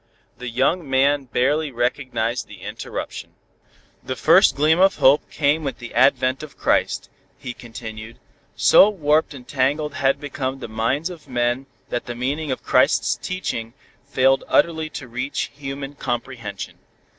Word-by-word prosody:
The 125 0 -5
young 135 +6 0
man 135 +1 +2
barely 145 +6 +1
recognized 120 -1 -1
the - - -13
interruption. - - -6 0.7
"The - - -4
first - - +5
gleam 155 +4 +3
of 195 +1 +5
hope 135 +3 +4
came 150 +1 +1
with 135 - -3
the 120 -2 -9
advent 130 +1 +3
of 155 -2 -10
Christ," - - +1 0.3
he 125 - -6
continued. 115 -1 -9 0.4
"So 205 - +7
warped 155 -6 +1
and 125 -2 -12
tangled 145 +2 0
had 135 0 +1
become 135 -2 -4
the 135 - -7
minds 115 +10 -1
of 165 -5 -12
men 120 +1 -1 0.2
that 120 - -3
the 120 - -4
meaning 140 +5 -2
of 130 - -4
Christ's - - +3
teaching 120 -11 -4 0.3
failed 135 0 +3
utterly 160 -2 +2
to 135 -4 -8
reach 125 +4 -3
human 135 0 -6
comprehension. 120 -6 -5
135 Hz, 145 wpm, -22 LUFS, 120-145 Hz, 0.7 s, So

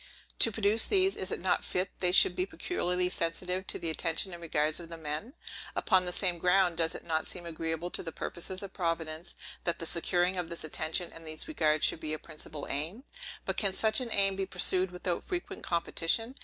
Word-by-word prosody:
To 230 - +6
produce 215 +1 +2
these, 385 -1 +4
is 190 - -4
it - - -2
not 185 - +1
fit 185 +1 -1
they 180 -1 +3
should 370 - +5
be 370 +1 0
peculiarly 180 - -1
sensible 180 +1 -1
to 190 - -4
the 165 - -1
attention 165 +4 0
and 170 - -7
regards 155 -1 +1
of 170 -1 -10
the 165 - -7
men? 155 - -3 0.4
Upon 185 -1 +3
the 180 - -1
same 180 -2 +2
ground, 180 -1 +3
does 165 -1 +2
it - - -7
not 160 -1 -1
seem 175 -1 -6
agreeable 165 +1 -3
to - - -1
the 165 - -5
purposes 185 +4 -3
of 195 - -8
Providence, 165 -1 -3 0.3
that 170 -1 0
the 165 - -5
securing 175 +2 +2
of 170 -2 -4
this 170 - -4
attention, 160 +3 -2
and 165 0 -11
these 155 0 -5
regards, 155 - +2
should - - +2
be 155 -1 -3
a - - -1
principal 155 -2 -7
aim? 165 - -1 0.4
But - - -2
can 195 -3 +3
such 215 +1 +3
an 245 -3 -4
aim 195 -2 +5
be 195 0 -2
pursued 185 0 +3
without 180 0 -3
frequent 360 -2 -4
competition? 170 +7 0
175 Hz, 210 wpm, -30 LUFS, 165-190 Hz, 0.4 s, To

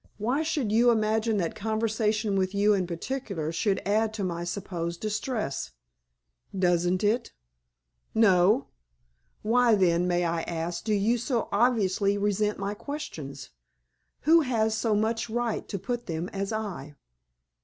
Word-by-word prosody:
Why 245 +8 0
should 295 -8 -1
you 235 +3 +5
imagine 220 -1 +2
that 170 -4 -1
conversation 220 -1 0
with 190 0 0
you 205 +1 +4
in 185 -3 0
particular 175 - -4
should 190 +4 0
add 220 +2 +1
to 205 - -3
my 170 -2 -2
supposed 175 -2 -4
distress?" 210 - -3 0.8
"Doesn't 180 0 +2
it?" 225 +4 +1 0.8
"No." 205 +2 +4 0.7
"Why, 235 +1 +4
then, 180 -2 +2
may 175 0 +1
I 165 0 0
ask, 170 +1 -4
do 215 - 0
you 220 +4 +2
so 240 -1 -1
obviously 205 -3 +2
resent 210 +1 0
my 200 +1 -3
questions? 210 - -7 0.7
Who 330 +3 +5
has 220 -5 +1
so 220 -1 +1
much 220 0 0
right 235 0 -2
to 200 - -4
put 240 +6 -4
them 165 +1 -3
as 195 +1 -3
I?" 190 -10 -5
210 Hz, 140 wpm, -27 LUFS, 180-225 Hz, 0.8 s, you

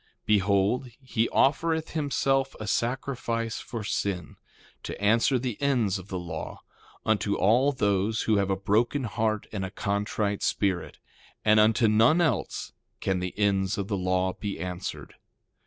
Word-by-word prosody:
2:7 - - -47
Behold, 100 +4 +2
he 115 -4 -1
offereth 160 +3 +1
himself 135 -3 0
a 110 - -5
sacrifice 115 -1 -2
for 115 -4 -6
sin, 95 -4 -2 0.5
to - - -6
answer 115 +6 +3
the 125 -2 -4
ends 120 -9 +1
of 95 - -11
the 95 - -4
law, 85 -3 -6 0.4
unto 105 -2 +1
all 125 +8 +3
those 105 -3 0
who 110 -2 +2
have 100 -1 +1
a 95 - +2
broken 110 +8 +1
heart 110 -2 -1
and 100 -3 -3
a 95 - -3
contrite 100 +1 -2
spirit; 95 -5 -1 0.5
and 110 0 +6
unto 110 +2 +4
none 115 +10 +5
else 170 -3 -1 0.3
can 95 -1 0
the 90 +1 -5
ends 100 -2 +1
of 100 0 -3
the 100 - 0
law 95 0 0
be 100 -2 -5
answered. 90 +1 -5
105 Hz, 155 wpm, -27 LUFS, 95-120 Hz, 0.5 s, and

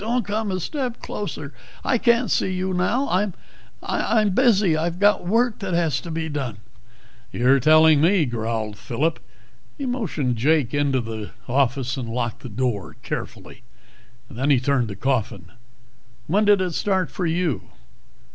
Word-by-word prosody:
"Don't 235 +1 -1
come 215 +1 -2
a 185 -1 -1
step 255 - -3
closer. 155 -8 -6 0.3
I 250 - +1
can't 235 -2 +2
see 190 - +1
you 185 0 -2
now. 210 +10 +1
I'm 190 0 0 0.5
I'm 215 -3 +1
busy, 205 -6 +3
I've 165 +2 -1
got 205 -2 +3
work 230 +3 +2
that 190 -3 -2
has 160 -7 +1
to 170 - -8
be 160 0 -3
done 135 -8 -4 0.4
" 120 +1 -29
"You're 130 +3 +3
telling 155 +1 +6
me," 175 0 +4
growled 110 -3 -3
Phillip. 150 +10 -1 0.6
He 280 - -4
motioned 170 - -1
Jake 145 +1 +2
into 140 -3 +1
the 110 -2 -6 0.2
office 130 0 0
and 120 -3 -4
locked 120 -1 -3
the 125 - -8
door 115 -2 -2
carefully. - - -6 0.7
Then 135 +2 -2
he 140 -4 +5
turned 130 -2 +1
to 100 - -6
Coffin. 105 -7 -2 0.7
"When 205 - +2
did 205 -2 +5
it 180 -2 -1
start 190 0 0
for 180 - -2
you?" 165 - 0
155 Hz, 160 wpm, -23 LUFS, 125-200 Hz, 0.7 s, telling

